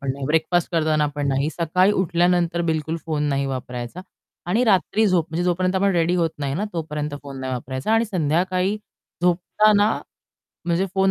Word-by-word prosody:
पण 135 -2 -2
नाही, 140 0 -6
ब्रेकफास्ट 160 +3 +1
करताना 155 -2 +2
पण 145 -1 -1
नाही. 135 +2 +1
सकाळी 180 +5 +2
उठल्यानंतर 175 -2 +1
बिलकुल 160 +1 -2
फोन 155 -2 -1
नाही 140 0 0
वापरायचा 125 +2 -5 0.5
आणि 230 +7 +3
रात्री 215 +1 +3
झोप 175 -4 +2
म्हणजे 170 +2 -1
जोपर्यंत 180 +1 +1
आपण 200 +1 +2
रेडी 170 +1 +2
होत 165 -2 +1
नाही 140 -1 -2
ना, 200 - -1
तोपर्यंत 150 -3 -3
फोन 140 -2 -8
नाही 130 0 -3
वापरायचा. 130 - -3
आणि 225 +1 +3
संध्याकाळी 185 +2 0 0.5
झोपताना 205 +4 +3 0.7
म्हणजे 175 +3 +1
फोन 190 0 +3
170 Hz, 170 wpm, -22 LUFS, 150-185 Hz, 0.7 s, आणि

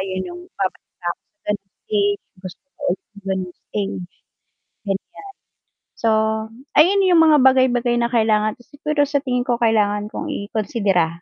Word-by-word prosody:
ayun 190 - -3
yung 350 - -9 0.2
babalik - - -4
ako - - +1 0.2
sa 315 - -56
ganyang 195 -2 -8
stage, 410 -1 +1 0.2
gusto 185 +6 -9 0.2
ko - - -13
ng 200 -1 -19
ganyang 185 -2 -2
stage, 195 -3 -3 0.8
ganyan. 195 -1 -4 0.8
So, 225 - +1 0.7
ayun 390 +5 +6
yung 345 -2 +6
mga 310 -2 +6
bagay 260 0 +6
bagay 240 0 +1
na 235 0 +1
kailangan 215 -2 +2
siguro 290 +2 -1
sa 285 - +2
tingin 250 -1 0
ko 240 -2 +2
kailangan 210 -2 +2
kong 310 - -4 0.2
ikonsidera. 200 -6 +1
230 Hz, 150 wpm, -21 LUFS, 200-290 Hz, 0.8 s, ayun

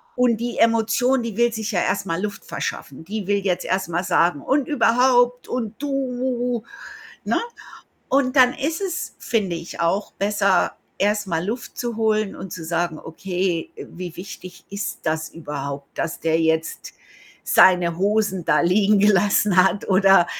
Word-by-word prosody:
Und 245 -3 +3
die 240 +1 -4
Emotion, 230 +3 +2
die 230 -3 -5
will 235 -1 +3
sich 220 -1 -3
ja 180 - +1
erst 195 +1 0
mal 165 0 -2
Luft 205 -1 -4
verschaffen. 140 +4 -5
Die 210 +1 -4
will 205 0 +2
jetzt 190 -3 -1
erst 190 -1 -1
mal 175 +2 -1
sagen: 175 -4 +2
„Und 270 - 0
überhaupt 245 -1 +3
und 230 -1 -4
du", 250 -4 -2 0.6
ne, - - 0 0.7
und 270 0 +1
dann 250 -1 +6
ist 315 +5 -2
es, 365 -2 -4
finde 195 -7 -1
ich, 165 +1 -8
auch 180 +5 0
besser, 200 -2 +1 0.3
erst 210 +1 +1
mal 165 -2 -1
Luft 230 +6 -5
zu 240 -2 -3
holen 215 -2 +1
und 190 - -8
zu 165 - -7
sagen: 170 -1 -1
„Okay, 175 +1 -3
wie 175 -1 -8
wichtig 180 -1 -10
ist 200 0 -5
das 155 0 -1
überhaupt, 140 -3 -7
dass 165 - -3
der 165 0 +1
jetzt 160 0 -1 0.5
seine 175 -2 +5
Hosen 200 -2 +1
da - - +4
liegen 200 +4 +3
gelassen 205 -1 +3
hat?", 195 +2 0
oder 195 -2 +5
200 Hz, 160 wpm, -22 LUFS, 175-235 Hz, 0.7 s, dann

